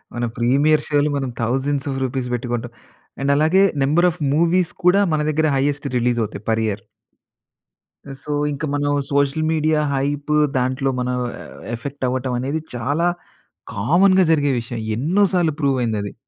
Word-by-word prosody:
మనం 120 Hz, 0 st, -2 dB
ప్రీమియర్ 140 Hz, +6 st, +3 dB
షోలు 145 Hz, 0 st, +2 dB
మనం 135 Hz, -2 st, -2 dB
థౌసండ్స్ 135 Hz, +4 st, -1 dB
ఆఫ్ 135 Hz, -, -3 dB
రూపీస్ 130 Hz, -1 st, -2 dB
పెట్టి 120 Hz, 0 st, -3 dB
కొంటాం. 120 Hz, 0 st, -3 dB, 0.5 s
అండ్ 140 Hz, +1 st, +1 dB
అలాగే 160 Hz, +6 st, +4 dB, 0.2 s
నంబర్ 165 Hz, +6 st, +3 dB
ఆఫ్ 160 Hz, -, -9 dB
మూవీస్ 170 Hz, +2 st, +2 dB
కూడా, 180 Hz, +3 st, +5 dB
మన 155 Hz, -, +1 dB
దగ్గర 155 Hz, +1 st, +1 dB
హయ్యేస్ట్ 145 Hz, +1 st, 0 dB
రిలీజ్ 120 Hz, 0 st, +1 dB
అవుతాయి 105 Hz, -1 st, -6 dB
పర్ 110 Hz, 0 st, +1 dB
ఇయర్. 100 Hz, -1 st, -4 dB, 1.4 s
సో 150 Hz, -, -6 dB, 0.2 s
ఇంకా 145 Hz, +2 st, -4 dB
మనం 145 Hz, 0 st, 0 dB, 0.2 s
సోషల్ 140 Hz, +2 st, +1 dB
మీడియా 155 Hz, -1 st, +1 dB
హైపు 145 Hz, +2 st, -1 dB, 0.2 s
దాంట్లో 130 Hz, +2 st, 0 dB
మనం 125 Hz, 0 st, -1 dB, 0.2 s
యవ్ -, -, -11 dB, 0.2 s
ఎఫెక్ట్ 135 Hz, +2 st, -5 dB
అవ్వటం 130 Hz, 0 st, -2 dB
అనేది 140 Hz, +5 st, -2 dB, 0.2 s
చాలా 145 Hz, +8 st, 0 dB, 0.7 s
కామన్‌గా 180 Hz, -, +3 dB
జరిగే 145 Hz, -3 st, +3 dB
విషయం. 120 Hz, 0 st, -6 dB, 0.2 s
ఎన్నో 170 Hz, -, +1 dB
సార్లు 170 Hz, -4 st, +2 dB
ప్రూవ్ 140 Hz, -2 st, +2 dB
అయింది 110 Hz, -3 st, -1 dB
అది. 100 Hz, -, -6 dB
140 Hz, 160 wpm, -20 LUFS, 125-155 Hz, 1.4 s, కూడా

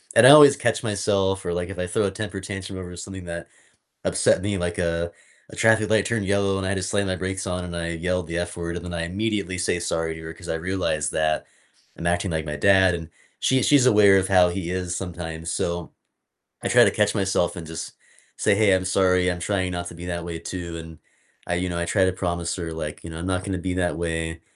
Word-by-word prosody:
And -, -, +8 dB
I -, -, +11 dB
always 145 Hz, -2 st, +9 dB
catch 120 Hz, -1 st, 0 dB
myself 100 Hz, -3 st, 0 dB
or, 85 Hz, -, -1 dB
like, 90 Hz, +1 st, -3 dB
if 95 Hz, -2 st, -7 dB
I 90 Hz, -, -1 dB
throw 110 Hz, +5 st, 0 dB
a 100 Hz, -, 0 dB
temper 100 Hz, 0 st, -5 dB
tantrum 95 Hz, 0 st, -6 dB
over 90 Hz, -1 st, -8 dB
something 95 Hz, +1 st, -8 dB
that 85 Hz, 0 st, -6 dB, 0.6 s
upset -, -, +2 dB
me, 100 Hz, +1 st, -1 dB
like 90 Hz, -1 st, -2 dB
a 85 Hz, -1 st, -1 dB, 0.4 s
a -, -, -10 dB
traffic 110 Hz, -1 st, +3 dB
light 110 Hz, -2 st, +3 dB
turned 115 Hz, -4 st, -1 dB
yellow 100 Hz, 0 st, +1 dB
and 95 Hz, -, -3 dB
I 95 Hz, -, 0 dB
just 95 Hz, -1 st, -2 dB
slammed 100 Hz, -1 st, 0 dB
my 95 Hz, -, 0 dB
brakes 95 Hz, +1 st, -3 dB
on 90 Hz, -1 st, -3 dB
and 85 Hz, -1 st, -6 dB
I 85 Hz, 0 st, -3 dB
yelled 90 Hz, +1 st, -2 dB
the 85 Hz, +1 st, -3 dB
F 85 Hz, 0 st, -3 dB
word 85 Hz, 0 st, -4 dB
and 85 Hz, -, -8 dB
then 90 Hz, -, -6 dB
I 85 Hz, -, -2 dB
immediately 100 Hz, +1 st, -2 dB
say 90 Hz, 0 st, 0 dB
sorry 80 Hz, -1 st, -2 dB
to 80 Hz, -, -9 dB
her 80 Hz, 0 st, -7 dB
'cause -, -, -12 dB
I -, -, 0 dB
realized 80 Hz, -4 st, -1 dB
that 80 Hz, 0 st, 0 dB, 0.5 s
I'm 85 Hz, -, -3 dB
acting 90 Hz, +2 st, 0 dB
like 80 Hz, -1 st, -2 dB
my 75 Hz, -1 st, -4 dB
dad 95 Hz, 0 st, +4 dB
and 80 Hz, -2 st, -7 dB, 0.3 s
she 130 Hz, 0 st, +2 dB
she's 140 Hz, -3 st, +5 dB
aware 105 Hz, -4 st, +6 dB
of 95 Hz, 0 st, +1 dB
how 90 Hz, -2 st, +6 dB
he 85 Hz, -1 st, -4 dB
is 90 Hz, -1 st, -2 dB
sometimes, 85 Hz, -2 st, -5 dB
so 85 Hz, 0 st, -2 dB, 0.7 s
I -, -, 0 dB
try -, -, +6 dB
to -, -, +4 dB
catch 105 Hz, 0 st, +1 dB
myself 95 Hz, -3 st, +1 dB
and 85 Hz, -, -7 dB
just 80 Hz, 0 st, -6 dB, 0.4 s
say, 100 Hz, -, +3 dB
"Hey, 105 Hz, -2 st, +4 dB
I'm 95 Hz, -, 0 dB
sorry. 90 Hz, -1 st, +2 dB
I'm 90 Hz, -, -4 dB
trying 95 Hz, 0 st, -1 dB
not 85 Hz, 0 st, -4 dB
to 85 Hz, -, -9 dB
be 85 Hz, +1 st, -8 dB
that 85 Hz, -1 st, -4 dB
way 85 Hz, -1 st, -5 dB
too." 85 Hz, -1 st, -6 dB
And 80 Hz, -1 st, -9 dB, 0.5 s
I -, -, -1 dB
you 90 Hz, +1 st, -1 dB
know, 85 Hz, -, -3 dB
I 85 Hz, -, -1 dB
try 95 Hz, +3 st, +2 dB
to 95 Hz, -, +2 dB
promise 85 Hz, -2 st, -2 dB
her, 85 Hz, -2 st, -4 dB
like, 75 Hz, -1 st, -5 dB
you 85 Hz, -, -8 dB
know, 80 Hz, 0 st, -7 dB
"I'm 90 Hz, -, -4 dB
not 95 Hz, 0 st, -1 dB
gonna 95 Hz, -2 st, -2 dB
be 90 Hz, +1 st, -2 dB
that 90 Hz, -1 st, 0 dB
way 80 Hz, -1 st, -3 dB
90 Hz, 250 wpm, -24 LUFS, 85-95 Hz, 0.7 s, I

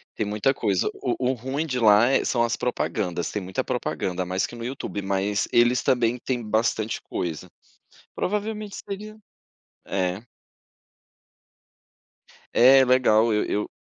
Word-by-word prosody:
tem 110 Hz, -, -1 dB
muita 105 Hz, +6 st, +1 dB
coisa. 100 Hz, -7 st, 0 dB
O 125 Hz, -, -2 dB, 0.2 s
o -, -, -1 dB
ruim 130 Hz, +6 st, -3 dB
de 130 Hz, -5 st, -2 dB
lá 110 Hz, +2 st, +6 dB
é 135 Hz, -, +2 dB
são 120 Hz, -2 st, +1 dB
as 120 Hz, -, -1 dB
propagandas, 90 Hz, -8 st, -2 dB
tem 105 Hz, -, -3 dB
muita 95 Hz, 0 st, -3 dB
propaganda, 90 Hz, 0 st, -2 dB
mais 95 Hz, +1 st, -1 dB
que -, -, -10 dB
no 115 Hz, 0 st, -7 dB
YouTube, 125 Hz, -5 st, -5 dB
mas 100 Hz, +1 st, -1 dB
eles 120 Hz, +1 st, +4 dB
também 120 Hz, -1 st, +1 dB
têm 125 Hz, -2 st, -3 dB
bastante 110 Hz, 0 st, -1 dB
coisa, 85 Hz, +1 st, -5 dB, 0.7 s
provavelmente 210 Hz, +1 st, -3 dB
seria 210 Hz, +2 st, -7 dB, 0.7 s
é. 95 Hz, +3 st, -2 dB, 2.3 s
É 130 Hz, +2 st, +7 dB
legal, 115 Hz, -3 st, +4 dB
eu 105 Hz, -, +1 dB
eu 105 Hz, -, -2 dB
115 Hz, 140 wpm, -24 LUFS, 100-130 Hz, 2.3 s, É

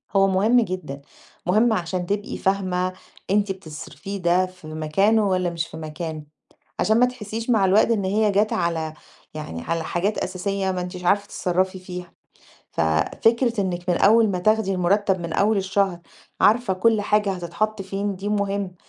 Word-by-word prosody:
هو 195 Hz, 0 st, +5 dB
مهم 210 Hz, +6 st, +3 dB
جدًا، 180 Hz, -9 st, -5 dB, 0.4 s
مهم 215 Hz, +6 st, +3 dB
علشان 180 Hz, -2 st, -2 dB
تبقي 205 Hz, +3 st, -3 dB
فاهمة 185 Hz, -1 st, 0 dB, 0.4 s
أنتِ 205 Hz, 0 st, +2 dB
بتصرفيه 190 Hz, +2 st, -7 dB
ده 180 Hz, 0 st, +2 dB
في 180 Hz, -3 st, -13 dB
مكانه 195 Hz, +8 st, +2 dB
والّا 185 Hz, -1 st, +1 dB
مش 165 Hz, -1 st, -3 dB
في 160 Hz, -, -10 dB
مكان، 155 Hz, 0 st, -6 dB, 0.5 s
علشان 220 Hz, +2 st, +3 dB
ما 250 Hz, -, +6 dB
تحسّيش 230 Hz, -2 st, -5 dB
مع 220 Hz, -5 st, +4 dB
الوقت 205 Hz, +5 st, +4 dB
إن 205 Hz, -4 st, +1 dB
هي 210 Hz, +2 st, +2 dB
جات 205 Hz, +2 st, +2 dB
على 165 Hz, -3 st, -1 dB, 0.4 s
يعني 150 Hz, -, -6 dB
على 165 Hz, -, -2 dB
حاجات 185 Hz, +6 st, -1 dB
أساسية 190 Hz, +1 st, -2 dB
ما 185 Hz, -1 st, -2 dB
أنتيش 180 Hz, 0 st, -6 dB
عارفة 200 Hz, +3 st, +3 dB
تتصرَّفي 185 Hz, 0 st, -1 dB
فيها. 180 Hz, -1 st, -8 dB, 0.6 s
ففكرة 225 Hz, -, +1 dB
إنِّك 180 Hz, -1 st, -3 dB
من 175 Hz, -, +3 dB
أول 220 Hz, +1 st, +5 dB
ما 185 Hz, -2 st, -1 dB
تاخدي 215 Hz, +1 st, +2 dB
المُرتَّب 190 Hz, +1 st, +1 dB
من 170 Hz, -1 st, -4 dB
أول 210 Hz, +4 st, +2 dB
الشهر 190 Hz, -2 st, 0 dB, 0.4 s
عارفة 225 Hz, -2 st, +4 dB
كل 220 Hz, +3 st, +2 dB
حاجة 210 Hz, 0 st, +1 dB
هتتحَط 190 Hz, +4 st, -2 dB
فين، 195 Hz, +1 st, -3 dB
دي 195 Hz, +3 st, -4 dB
مهم. 200 Hz, -2 st, -1 dB
190 Hz, 160 wpm, -23 LUFS, 175-210 Hz, 0.6 s, ما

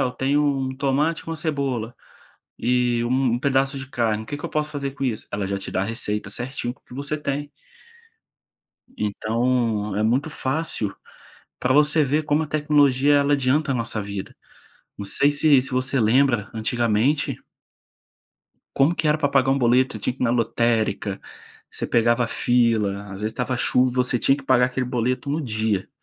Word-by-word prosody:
eu 125 Hz, -, 0 dB
tenho 140 Hz, +3 st, +1 dB
um 135 Hz, -2 st, 0 dB
tomate 140 Hz, +4 st, 0 dB
com 165 Hz, -, -7 dB
uma 165 Hz, -, -3 dB
cebola, 140 Hz, -7 st, -2 dB, 0.7 s
e 120 Hz, 0 st, +1 dB
um 125 Hz, 0 st, +1 dB
pedaço 135 Hz, +1 st, +1 dB
de 135 Hz, -1 st, -7 dB
carne. 115 Hz, -4 st, 0 dB
O -, -, -14 dB
que 145 Hz, +5 st, -5 dB
que -, -, -6 dB
eu -, -, -5 dB
posso 150 Hz, 0 st, -1 dB
fazer 140 Hz, -2 st, -4 dB
com 140 Hz, 0 st, -6 dB
isso?" 120 Hz, -5 st, -2 dB
Ela 100 Hz, -1 st, -2 dB
já 100 Hz, 0 st, -2 dB
te 100 Hz, -, -6 dB
dá 95 Hz, -, 0 dB
a -, -, +1 dB
receita 105 Hz, -2 st, -3 dB
certinho 125 Hz, +2 st, -4 dB
com -, -, -30 dB
o -, -, -56 dB
que -, -, -14 dB
você 140 Hz, +3 st, -3 dB
tem. 145 Hz, 0 st, -4 dB, 1.5 s
Então, 110 Hz, 0 st, -1 dB
é 105 Hz, -, +1 dB
muito 125 Hz, +7 st, +1 dB
fácil 130 Hz, -9 st, -2 dB, 0.7 s
pra 125 Hz, -, +1 dB
você 150 Hz, +1 st, +4 dB
ver 150 Hz, +3 st, 0 dB
como 150 Hz, +1 st, +1 dB
a -, -, -8 dB
tecnologia 145 Hz, -2 st, +3 dB
ela 140 Hz, 0 st, +3 dB
adianta 140 Hz, +2 st, +1 dB
a -, -, -1 dB
nossa 115 Hz, -3 st, -2 dB
vida. 100 Hz, -1 st, -7 dB, 0.6 s
Não 100 Hz, -, -5 dB
sei 140 Hz, +8 st, +2 dB
se 145 Hz, -1 st, +4 dB
se 135 Hz, -, -4 dB
você 130 Hz, +1 st, +1 dB
lembra, 120 Hz, -1 st, +2 dB
antigamente 120 Hz, +5 st, 0 dB, 1.4 s
como 140 Hz, +5 st, +3 dB
que 160 Hz, -, -2 dB
era 150 Hz, +1 st, +2 dB
pra 145 Hz, -, +1 dB
pagar 135 Hz, -1 st, +2 dB
um 135 Hz, -, +2 dB
boleto, 125 Hz, +1 st, +3 dB
você 110 Hz, -, -5 dB
tinha 125 Hz, -, -1 dB
que -, -, -5 dB
ir -, -, +3 dB
na 115 Hz, -, +2 dB
lotérica, 115 Hz, -4 st, 0 dB, 0.5 s
você -, -, -3 dB
pegava 120 Hz, +1 st, +2 dB
fila, 110 Hz, -5 st, +1 dB
às 100 Hz, -1 st, -9 dB
vezes 110 Hz, +1 st, -2 dB
estava 125 Hz, +1 st, -2 dB
chuva 125 Hz, +1 st, +2 dB
e -, -, -8 dB
você 125 Hz, -1 st, +1 dB
tinha 135 Hz, +4 st, +3 dB
que 140 Hz, -, -10 dB
pagar 125 Hz, -2 st, +4 dB
aquele 125 Hz, 0 st, -3 dB
boleto 125 Hz, +2 st, -1 dB
no 155 Hz, -, -1 dB
dia. 110 Hz, -5 st, -1 dB
125 Hz, 190 wpm, -23 LUFS, 115-140 Hz, 1.5 s, você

